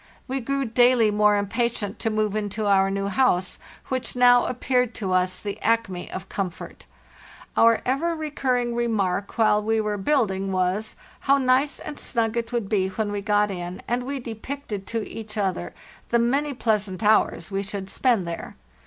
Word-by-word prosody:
We 270 +1 -2
grew 275 +2 -1
daily 240 -1 +4
more 210 0 +4
impatient 210 0 -1
to 225 - 0
move 215 -1 0
into 210 0 -2
our 195 -1 +4
new 195 0 -2
house, 200 -4 +1 0.3
which 255 -1 -3
now 245 0 +6
appeared 250 -1 0
to 190 -3 -2
us 185 0 +1
the 205 -1 -6
acme 220 -5 0
of 190 +1 -6
comfort. 185 -3 -5 0.7
Our 230 0 +4
ever 305 +7 0
recurring 260 -6 -1
remark 205 -5 -1
while 215 -2 +4
we 220 +1 +1
were 210 -1 -1
building 195 -5 +1
was, 185 +3 -1 0.2
how 275 +1 +3
nice 265 +2 +2
and 295 - -7
snug 230 -2 -1
it 235 0 -2
would 235 -4 -1
be 195 -3 +1
when 205 +2 -2
we 205 -1 -2
got 210 0 +2
in, 180 -1 -6
and 240 +1 0
we 275 +2 -4
depicted 230 -2 -6
to 225 -2 -3
each 220 -1 -8
other 190 -4 -1 0.4
the 235 - +3
many 275 +5 +1
pleasant 210 -4 -1
hours 215 0 +2
we 195 0 -1
should 195 -1 -5
spend 230 -2 +1
there. 170 0 -6
220 Hz, 170 wpm, -24 LUFS, 195-245 Hz, 0.7 s, now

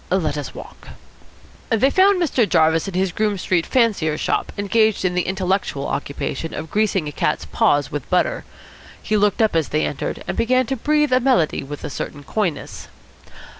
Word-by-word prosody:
Let 180 -5 0
us 145 -1 -6
walk." - - -11 0.8
They 240 +4 +3
found 380 +2 +4
Mr. 260 - +1
Jarvis 160 +1 +3
in 195 - -5
his 190 0 +1
Groome 210 +2 0
Street 175 -2 0
fancier's 200 -11 +1
shop, - - -1
engaged 215 0 +1
in 180 - +1
the 180 -1 -1
intellectual 190 -6 -1
occupation 145 +2 -4
of 155 +1 -6
greasing 205 -6 +1
a - - -4
cat's - - -1
paws 145 -1 +1
with 145 -3 -5
butter. 340 - +1 0.6
He 215 - -2
looked 210 +2 +2
up 215 - +1
as 160 -3 +1
they 155 - 0
entered, 145 - -4
and - - -2
began 255 +2 +2
to 270 - -2
breathe 300 +2 +1
a 255 - +5
melody 250 - +2
with 145 +2 -8
a - - -5
certain 145 +1 -6
coyness. 175 -4 -3
190 Hz, 180 wpm, -21 LUFS, 155-230 Hz, 0.8 s, a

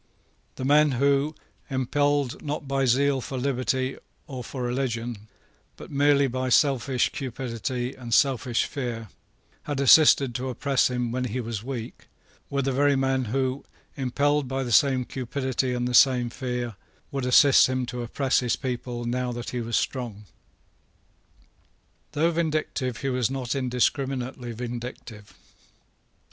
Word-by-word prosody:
The 130 - -5
men 150 +1 +4
who, 140 +4 +1 0.3
impelled, 145 +1 0
not 145 -1 -4
by 135 0 +1
zeal 135 +2 +2
for 130 - -5
liberty 130 0 -1 0.3
or 130 -5 -7
for 130 +1 -6
religion, 120 -3 -3 0.5
but - - -11
merely 140 0 +4
by 130 0 -2
selfish 130 -2 +2
cupidity 125 -1 -4
and 120 -2 -9
selfish 125 -2 +2
fear, 120 -5 -5 0.6
had 145 -2 -3
assisted 140 -2 +6
to 130 +2 -3
oppress 135 +1 +1
him 125 -2 -2
when 125 +1 -2
he 125 +1 -3
was 115 -3 -4
weak, 120 -3 -7 0.4
were 140 -1 -1
the 135 - 0
very 140 +2 +3
men 135 -1 +1
who, 130 +3 -1 0.3
impelled 140 +2 0
by 135 +1 -2
the 120 - -4
same 130 0 +4
cupidity 130 0 -2
and 120 0 -1
the 125 - -3
same 125 -1 +5
fear, 125 -4 -4 0.3
would 135 -2 -3
assist 135 +2 +6
him 130 -1 -1
to 125 0 -5
oppress 130 +3 +1
his 125 -2 0
people 120 -1 -4
now 125 +1 -1
that 120 0 -5
he 125 - -3
was 115 0 -1
strong. 120 -6 -3 1.9
Though 160 +3 +2
vindictive, 155 -6 -1
he 135 - -1
was 125 -3 0
not 130 -3 -3
indiscriminately 130 -1 -1
vindictive. 120 -2 -7
130 Hz, 140 wpm, -25 LUFS, 120-140 Hz, 1.9 s, assisted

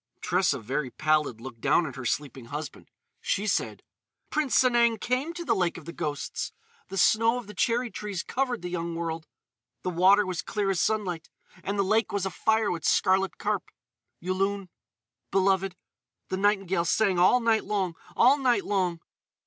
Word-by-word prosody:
Tressa, 180 +1 +1
very 130 +4 -3
pallid, 150 -3 0
looked 115 -2 -10
down 175 - +3
at 140 - -6
her 130 -2 -7
sleeping 130 0 -3
husband. 150 +4 -7 0.3
She 200 - -1
said: 215 - -1 0.5
"Prince 300 -4 +1
Sanang 235 -3 +3
came 255 +8 -1
to 345 0 -6
the - - +2
Lake 180 -4 0
of 165 - -11
the 170 - -7
Ghosts. 150 -5 -4 0.3
The 195 - -6
snow 225 +5 +4
of 245 - -6
the 210 - -10
cherry 235 +4 0
trees 205 -4 -4
covered 250 -5 -2
the 180 - -3
young 170 -1 -3
world. 165 -1 -4 0.6
"The 180 - -1
water 190 +4 +5
was 185 0 -3
clear 200 -1 -1
as 185 - 0
sunlight; 185 -7 -1 0.3
and 200 +1 -2
the 200 - +3
lake 215 +4 +1
was 200 -2 -1
afire 220 +3 +1
with 170 -2 -4
scarlet 190 +1 +2
carp.... - - -2 0.5
Yulun—beloved—the 190 - -2 0.6
nightingale 195 -3 +1
sang 190 +1 +2
all 185 +8 +5
night 230 -2 +2
long—all 205 - +1
night 250 -3 +2
long.... 180 -4 0
190 Hz, 160 wpm, -27 LUFS, 170-220 Hz, 0.6 s, water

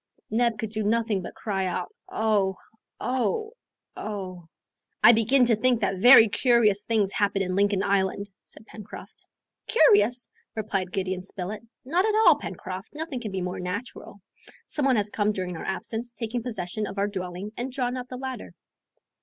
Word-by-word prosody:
Neb 230 0 +2
could 220 -1 -4
do 215 0 -2
nothing 220 -1 +1
but - - -8
cry 195 -3 -2
out 180 0 -4 0.2
"Oh! 205 -4 +1 0.4
oh! 435 - -1 0.4
oh!" 185 -5 -6 0.6
"I 225 - +10
begin 240 +3 +4
to 235 -1 +4
think 245 +2 +2
that 195 -2 0
very 240 +1 +9
curious 215 -3 +3
things 215 -4 +1
happen 200 -1 +1
in 185 -1 -2
Lincoln 200 0 +2
Island!" 200 0 0
said 215 - -10
Pencroft. 215 -1 -11 0.4
"Curious?" 245 - +4 0.3
replied 195 -4 -2
Gideon 185 0 -2
Spilett, 195 +2 -6 0.2
"not 340 +8 +2
at 430 -1 +1
all, - - +8
Pencroft, 190 +7 -7
nothing 305 -4 -4
can 220 -4 -5
be 190 -1 -3
more 180 0 -4
natural. 200 +3 -6 0.5
Some 290 - -2
one 260 - +4
has 210 -1 0
come 210 0 +1
during 185 -2 -4
our - - -7
absence, 225 +5 -4
taken 235 0 -3
possession 215 -3 -3
of 195 - -8
our 200 +1 +1
dwelling 185 0 -5
and 250 +2 -3
drawn 250 -1 -1
up 250 -1 -5
the 255 - -7
ladder." 260 -1 -6
215 Hz, 170 wpm, -26 LUFS, 195-240 Hz, 0.6 s, I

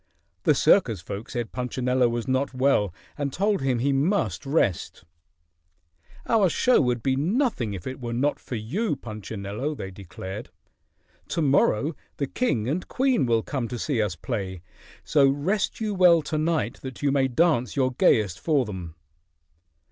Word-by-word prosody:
The - - +5
circus 115 - +4
folk 100 +5 -7
said 120 -3 -4
Punchinello 125 0 0
was 120 +1 -3
not 130 0 0
well 130 -7 +2 0.3
and 140 -1 -1
told 200 +2 0
him 130 -2 +1
he 140 +4 +1
must 155 +1 0
rest. 135 - 0 1.2
"Our 210 -5 +3
show 250 +9 +3
would 125 -3 0
be 135 - +2
as 130 - -1
nothing 175 - 0
if 90 - -8
it 130 0 -6
were 120 -1 -4
not 135 +5 0
for 125 - -6
you, 145 - -1
Punchinello," 110 +3 -5
they 95 -8 -6
declared. 95 +3 -8 0.8
"To 165 - -1
morrow 140 0 +2 0.2
the 140 - 0
king 130 - -1
and 160 +7 -2
queen 255 - +1
will 115 -1 +2
come 130 -5 -3
to 120 - -5
see 125 -1 0
us 105 -5 -1
play, 95 +1 -4 0.4
so 145 -3 +4
rest 170 +10 -1
you 215 -2 -1
well 175 -4 +5
to 155 - -2
night 160 0 0
that 130 +1 -8
you 140 - +3
may 135 -1 +2
dance 130 -2 +1
your 130 -2 +2
gayest 105 -6 +2
for 145 -6 +1
them." 90 -6 -7
130 Hz, 165 wpm, -25 LUFS, 110-155 Hz, 1.2 s, The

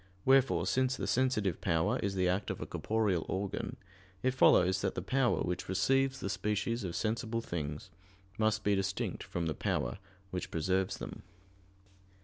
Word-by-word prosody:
Wherefore, 135 0 +4
since 130 0 +1
the - - -3
sensitive 110 -8 +1
power 80 -2 +1
is 100 -1 -1
the 90 -1 +2
act 95 +3 0
of - - -3
a - - -4
corporeal 105 -6 0
organ, 95 +1 -3 0.5
it 130 - +3
follows 95 -7 +5
that - - -1
the - - -2
power 130 +3 +2
which 90 0 -3
receives 135 +8 +2
the 100 - -3
species 105 +4 -1
of 90 -3 -4
sensible 115 +1 -1
things 75 -8 -5 0.5
must 110 0 +2
be 105 - +3
distinct 95 0 -1
from 85 -1 -3
the 80 - 0
power 65 +1 -2 0.3
which 95 0 -3
preserves 95 +3 0
them. - - -7
100 Hz, 160 wpm, -32 LUFS, 90-115 Hz, 0.5 s, follows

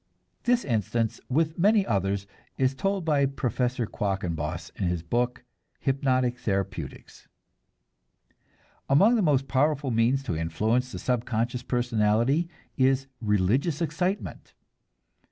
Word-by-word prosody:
This 245 0 +2
instance 115 -1 -1
with 160 +5 +1
many 205 +2 +4
others 100 -1 0 0.3
is 130 0 +2
told 195 +3 -1
by 145 -3 +3
Professor 125 -2 -1
Quackenbos 90 -7 -3
in 95 - -1
his 85 -2 -1
book, 120 +7 -1 0.4
"Hypnotic 130 -2 +1
Therapeutics." 100 -2 -4 1.6
Among 195 - +6
the 235 - +3
most 140 -6 +2
powerful 140 0 +1
means 120 +4 +2
to 90 - -2
influence 110 +11 0
the - - -5
subconscious 120 0 -1
personality 120 +5 +1 0.3
is 135 0 +3 0.2
religious 110 - +1
excitement. 180 +4 -3
125 Hz, 110 wpm, -27 LUFS, 110-145 Hz, 1.6 s, Among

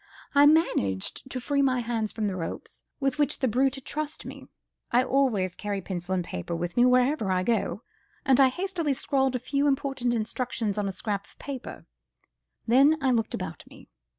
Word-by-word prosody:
I 285 0 +7
managed 265 - +1
to 255 - -3
free 280 +3 0
my 260 -2 +2
hands 225 -2 -2
from 220 - -3
the 195 -2 -1
ropes, 165 -3 -6 0.2
with 275 0 -1
which 290 -1 +1
the 260 - 0
brute 260 +4 +2
had 270 - -10
trussed 305 +1 -4
me; - - -9 0.4
I 245 +2 +4
always 245 -9 +1
carry 205 -1 -3
pencil 185 0 -3
and 180 - 0
paper 90 - -5
with 175 +1 -4
me 245 - +5
wherever 250 -3 +3
I 185 0 +1
go, 215 -2 -1 0.4
and 270 -2 +4
I 270 - +8
hastily 350 -1 -1
scrawled 265 -1 0
a - - 0
few 280 +4 0
important 270 -3 0
instructions 225 -2 -2
on 205 - -1
a - - -1
scrap 200 +1 -3
of - - -23
paper; 275 -3 -7 0.8
then 275 +7 +5
I 270 -3 +2
looked 225 -3 0
about - - -6
me. - - -16
250 Hz, 190 wpm, -27 LUFS, 205-275 Hz, 0.8 s, I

